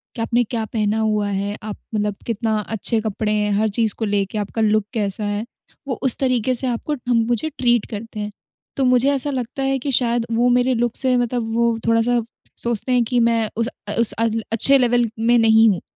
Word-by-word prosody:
कि 230 - -4
आपने 240 +2 +1
क्या 230 0 -3
पहना 215 -1 0
हुआ 215 -2 0
है, 200 +1 -2
आप 210 -1 -6 0.2
मतलब 210 -1 -1
कितना 225 -1 -1
अच्छे 220 +2 0
कपड़े 215 0 -2
हैं, 210 -1 0
हर 215 +2 +1
चीज़ 220 0 +1
को 225 - -1
लेके 200 0 -1
आपका 210 +2 -3
लुक 215 -1 +2
कैसा 210 -2 -1
है। 205 +2 -2 0.4
वो 260 - -1
उस 260 - +3
तरीके 255 -2 +1
से 255 +2 +2
आपको 245 +5 -2
ठम 245 -2 -2
मुझे 240 +6 0
ट्रीट 240 -3 +2
करते 220 +1 -7
हैं। 210 0 -4 0.5
तो 275 - +1
मुझे 250 +2 +3
ऐसा 275 +1 0
लगता 260 +1 -4
है 270 0 +1
कि 275 +2 -3
शायद 240 -2 +1
वो 235 +2 +2
मेरे 250 +1 +2
लुक 240 -1 -1
से 260 -1 +2
मतलब 240 -2 -1
वो 235 -1 +2
थोड़ा-सा 230 +1 +2 0.4
सोचते 235 +1 -1
हैं 250 -1 +3
कि 245 +1 0
मैं 230 -2 +2
उस 230 0 0 0.2
अ, 205 - -2
उस 230 - +4
अल 225 0 -1
अच्छे 250 +5 +6
लेवल 240 -2 +2
में 235 +2 +3
नहीं 225 0 +5
हूँ, 190 -4 -1
230 Hz, 215 wpm, -20 LUFS, 215-245 Hz, 0.5 s, अच्छे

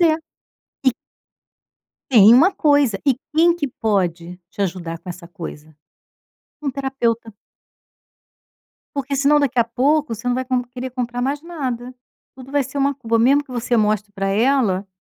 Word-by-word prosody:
é, 325 -2 +5 0.7
e - - +7 1.2
tem 220 -3 +8
uma 340 +10 +5
coisa. 285 -8 +2
E 265 - +4 0.2
quem 335 +2 +5
que 295 - -2
pode 180 -7 -2
te - - -10
ajudar 170 -3 -4
com 185 - -14
essa 175 0 -8
coisa? 160 -4 -9 0.9
Um 285 - -1
terapeuta. 240 -4 -2 1.6
Porque 280 0 -2
senão 285 +2 +4
daqui 270 -3 0
a 235 - +5
pouco 275 +3 +1
você 230 +3 -5
não 245 - +1
vai 260 - -2
com 255 -1 0
querer 250 +1 -7
comprar 245 -1 -4
mais 280 +4 -1
nada, 255 -8 -5 0.4
tudo 260 +1 -12
vai 285 - +2
ser 270 +2 -6
uma 280 +1 +1
culpa, 230 -4 -1
mesmo 275 +5 +4
que 270 - -18
você 240 0 -1
mostre 210 -1 0
pra 195 -1 -2
ela 210 -3 +1
245 Hz, 160 wpm, -20 LUFS, 210-275 Hz, 1.6 s, tem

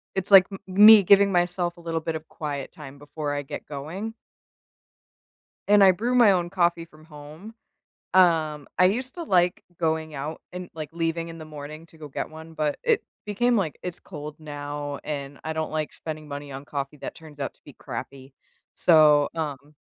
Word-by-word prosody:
It's 190 +1 -2
like 190 -1 +9
m 195 - -6
me 205 +2 +9
giving 200 +1 +5
myself 175 -1 0
a 170 - -13
little 165 -1 -2
bit 160 0 -3
of 160 0 -7
quiet 145 -3 -5
time 140 -2 -11
before 145 +1 -5
I 145 - -2
get - - -7
going. 165 +10 -6 1.5
And 205 0 +6
I 190 - +8
brew 235 +7 -1
my 230 -5 +7
own 175 -2 0
coffee 170 -3 +1
from 155 -1 -19
home. 155 +7 -12 0.6
Um, 160 -5 +3
I 180 - +7
used 250 +7 -1
to 345 - -6
like 180 - +2 0.2
going 160 -1 -1
out 145 +3 -5
and, 180 0 -7
like, 155 -2 -6
leaving 165 0 -2
in 165 - -9
the 160 - -8
morning 155 +1 -9
to 160 - -20
go 150 -1 -9
get 135 - -5
one, 160 +1 -11
but 150 -2 -1
it 465 -3 +2 0.2
became, 235 +4 +1
like 170 -7 -1
"It's 180 -2 -6
cold 150 -3 -9
now, 145 -1 -6
and 140 -2 -5
I 160 - -2
don't 160 0 -3
like 155 -1 -2
spending 155 -1 -7
money 145 0 -7
on 135 +1 -8
coffee 140 0 -5
that - - -7
turns 150 -3 -14
out 135 - -3
to - - -32
be - - -12
crappy." 135 0 -8 0.4
So, 150 -3 +5
um, 150 -2 -5
160 Hz, 195 wpm, -25 LUFS, 150-180 Hz, 1.5 s, like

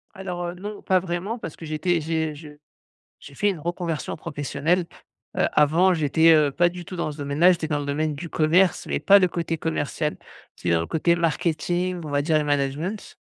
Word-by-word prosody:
Alors, 180 -2 -4
heu, 175 - -4
non 205 +3 -7
pas 185 -1 +2
vraiment 185 +6 -3
parce 165 - -7
que 165 - -10
j'étais 160 +2 0
j'ai 160 0 -1
je 150 +1 -11 0.7
j'ai 140 - -13
fait 205 +8 +2
une 185 -6 -3
reconversion 170 -1 -3
professionnelle. 155 +3 -1 0.5
Heu, - - +3
avant, 165 +5 +4
j'étais, 160 +1 +4
heu, 150 -3 +4
pas 175 +4 +3
du 175 0 -9
tout 185 - -8
dans 170 -3 -2
ce 150 - -11
domaine-là, 145 +6 +3
j'étais 165 -3 -1
dans 150 -1 -1
le 145 - -4
domaine 150 +1 -1
du 165 +3 -7
commerce, 170 +4 +2
mais - - -1
pas 200 0 +6
le 185 - +3
côté 165 -1 -3
commercial, 155 -1 -2 0.4
tu - - -7
sais 85 - +3
dans 80 - +3
le - - -4
côté 170 +2 +2
marketing, 175 +2 -1
on 150 - -6
va 145 0 +1
dire, 155 +1 +2
le 150 - +1
management 145 +8 -2
165 Hz, 210 wpm, -24 LUFS, 150-175 Hz, 0.7 s, pas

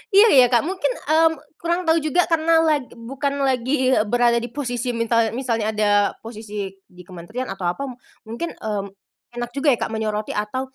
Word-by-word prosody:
Iya 420 +3 +8
iya, 255 -3 +7
Kak, 240 -2 +3
mungkin, 380 +6 -1 0.2
mmm, 320 +1 +5 0.3
kurang 345 +2 0
tahu 325 +1 +3
juga, 310 +4 +2
karena 325 0 +4
lag 300 -5 +1
bukan 275 +4 -3
lagi 260 0 +1 0.2
berada 240 +1 +3
di 240 - -4
posisi 245 -2 -3
mintal 230 -1 +1
misalnya 230 -4 -1
ada 210 -1 +2 0.3
posisi 210 -3 -6 0.2
di 180 0 -15
kementerian 190 +9 -7
atau 195 -2 -5
apa. 225 +11 -4
M 255 - -6 0.3
mungkin, 235 +10 -4
mmm, 210 -2 -3 0.5
enak 240 0 -3
juga 280 +2 -1
ya, - - -15
Kak, - - -2
menyoroti 215 -1 -2
atau 260 +6 -3
245 Hz, 180 wpm, -22 LUFS, 220-290 Hz, 0.5 s, Iya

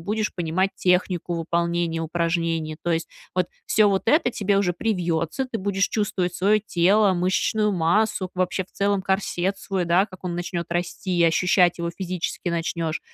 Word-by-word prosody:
будешь 210 +5 -2
понимать 180 +2 0
технику 180 -1 +1
выполнения 170 0 -1
упражнений. 165 -1 -1
То 175 - -1
есть 165 0 -1 0.3
вот 180 -1 +1 0.2
всё 215 -1 +4
вот 195 -1 +1
это 300 0 +3
тебе 200 -2 +1
уже 185 -3 +1
привьется, 175 - -1
ты 250 -3 -4
будешь 195 0 0
чувствовать 185 -4 -1
свое 200 +4 +3
тело, 195 +1 +3
мышечную 190 +4 +1
массу, 185 +3 +1
вообще 185 +1 -1
в - - -32
целом 200 -1 0
корсет 190 -1 -1
свой, 190 -2 -2
да, 175 +3 +3
как 185 -2 -14
он 175 -1 -2
начнет 175 0 -3
расти, 175 +1 -2
и 170 - +4
ощущать 180 +2 +3
его 170 0 -2
физически 180 -1 -3
начнешь. 165 -1 -2
180 Hz, 165 wpm, -24 LUFS, 170-195 Hz, 0.3 s, всё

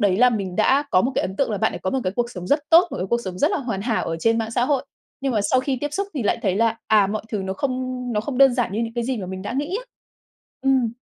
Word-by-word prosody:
đấy 195 -3 +3
là 250 +3 +5
mình 195 -6 -3
đã 280 +2 +3
có 185 - +5
một 260 - 0
cái - - +1
ấn 190 +1 -4
tượng 275 - +1
là 210 - -1
bạn - - +1
đấy - - -5
có 185 - -1
một 265 - 0
cái 185 - 0
cuộc 240 -1 0
sống 180 -5 -7
rất 285 +7 +3
tốt, 340 +2 +7
một - - -5
cái 185 - -2
cuộc 235 +4 0
sống 185 -1 -5
rất 295 - +3
là - - 0
hoàn 230 -8 -3
hảo 225 0 0
ở 165 - -2
trên 225 +3 +2
mạng 225 -1 -2
xã 240 +1 +1
hội. 280 0 0 0.4
Nhưng 270 -1 -1
mà 215 - +1
sau 255 +5 +2
khi 265 0 -1
tiếp 290 0 -3
xúc 395 +5 -1
thì 275 - -2
lại 205 - +1
thấy 190 -4 +1
là, 225 +1 +2
à, 210 -2 +5
mọi 210 +2 -3
thứ 215 - -2
nó 190 0 -3
không 255 +2 -3
nó 210 - +1
không 250 +3 -4
đơn 270 -2 +6
giản 245 -6 0
như 215 - -1
những 230 0 -4
cái 240 -1 -1
gì 260 +1 -1
mà 195 -4 -5
mình 185 +1 -6
đã 205 - -4
nghĩ 290 +8 -2
á. - - -13 0.8
Ừm. 260 -4 +2
235 Hz, 330 wpm, -22 LUFS, 200-265 Hz, 0.8 s, tốt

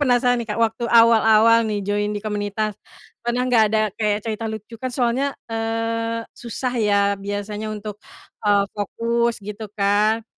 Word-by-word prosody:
penasaran 245 -2 +3
nih 230 - -6
Kak, 210 - -2
waktu 230 +1 0
awal-awal 230 -1 +6
nih 205 -2 -2
join 205 +1 0
di 205 - -7
komunitas, 210 0 -2 0.5
pernah 240 +1 -1
gak 240 -3 +4
ada 215 +1 +1
kayak 210 -1 -1
cerita 225 0 -3
lucu 220 +1 -8
kan 255 - -2
soalnya, 255 +3 0
eee, 230 0 -2
susah 245 +2 -4
ya 205 -2 +3 0.2
biasanya 205 +2 -4
untuk, 210 -1 -6 0.4
eee, 205 -1 +3
fokus 230 +3 -1
gitu 210 +1 -6
kan, 210 +2 +2
220 Hz, 150 wpm, -22 LUFS, 210-230 Hz, 0.5 s, awal-awal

